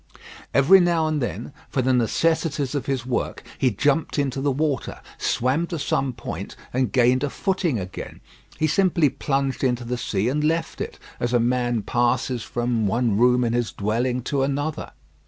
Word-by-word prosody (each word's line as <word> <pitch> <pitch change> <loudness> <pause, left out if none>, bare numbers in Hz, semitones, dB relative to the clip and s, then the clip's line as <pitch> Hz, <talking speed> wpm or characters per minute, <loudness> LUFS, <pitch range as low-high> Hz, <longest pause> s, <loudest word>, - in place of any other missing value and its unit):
Every 155 +8 +6
now 170 -3 +2
and 155 -2 0
then, 125 +3 -4 0.2
for 130 - 0
the 130 +1 +2
necessities 145 +3 +1
of 145 - -3
his 130 -3 -1
work, 125 -2 -2 0.2
he 130 - +3
jumped 145 +10 0
into 135 -2 0
the 140 0 +1
water, 140 -1 -1 0.2
swam 135 +8 +1
to 170 - -4
some 135 -2 0
point, 100 -5 -6 0.2
and 130 0 +1
gained 125 +1 +3
a 145 - 0
footing 185 - 0
again. 95 -1 -7 0.4
He 155 - +1
simply 170 -2 +3
plunged 135 0 -1
into 125 -2 +1
the 125 +1 -3
sea 100 -1 -1
and 145 +4 0
left 165 +2 -1
it, - - -5 0.2
as 120 0 -1
a 120 - +4
man 120 -1 +1
passes 120 +2 0
from 120 -2 -1
one 115 +1 +1
room 125 +3 +4
in 115 -1 0
his 120 -2 0
dwelling 120 +4 -1
to 140 +1 -1
another. 140 +3 -2
130 Hz, 175 wpm, -23 LUFS, 120-145 Hz, 0.4 s, Every